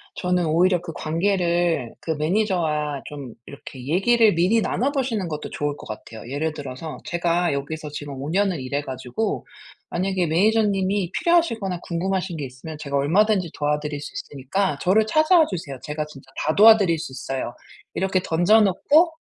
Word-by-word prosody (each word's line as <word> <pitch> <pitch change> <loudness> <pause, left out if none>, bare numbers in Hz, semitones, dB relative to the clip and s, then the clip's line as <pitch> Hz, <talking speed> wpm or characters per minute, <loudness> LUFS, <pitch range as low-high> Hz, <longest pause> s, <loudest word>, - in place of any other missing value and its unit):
저는 180 -1 0
오히려 175 +3 +3
그 175 -1 -7
관계를 170 - 0
그 160 - -3
매니저와 155 -4 0
좀 140 -6 -8
이렇게 130 -2 -10
얘기를 215 +6 +4
미리 185 +7 +3
나눠 265 +7 0
보시는 245 - -1
것도 150 -1 -5
좋을 145 0 -2
것 - - -11
같아요. 110 +2 -9
예를 155 +3 -1
들어서 145 +1 -7
"제가 175 0 +1
여기서 150 +2 -4
지금 145 -1 -7
5 145 - -4
년을 185 -4 +1
일해 140 +3 -2
가지고 130 - -3 0.4
만약에 185 -1 0
매니저님이 195 +1 +2
필요하시거나 230 - +1
궁금하신 180 0 -2
게 145 - -3
있으면 130 +5 -9
제가 140 -2 -4
얼마든지 185 +4 +2
도와드릴 150 0 -1
수 145 - -8
있으니까 145 +4 -2
저를 210 +4 +3
찾아와 310 +7 +4
주세요. 160 - -5
제가 150 0 -3
진짜 135 -3 -15 0.2
다 155 - +2
도와드릴 205 -6 +7
수 145 - -6
있어요." 130 -2 -4 0.4
이렇게 190 -1 0
던져 175 +7 +4
놓고 295 - +3
170 Hz, 375 characters per minute, -23 LUFS, 145-195 Hz, 0.4 s, 도와드릴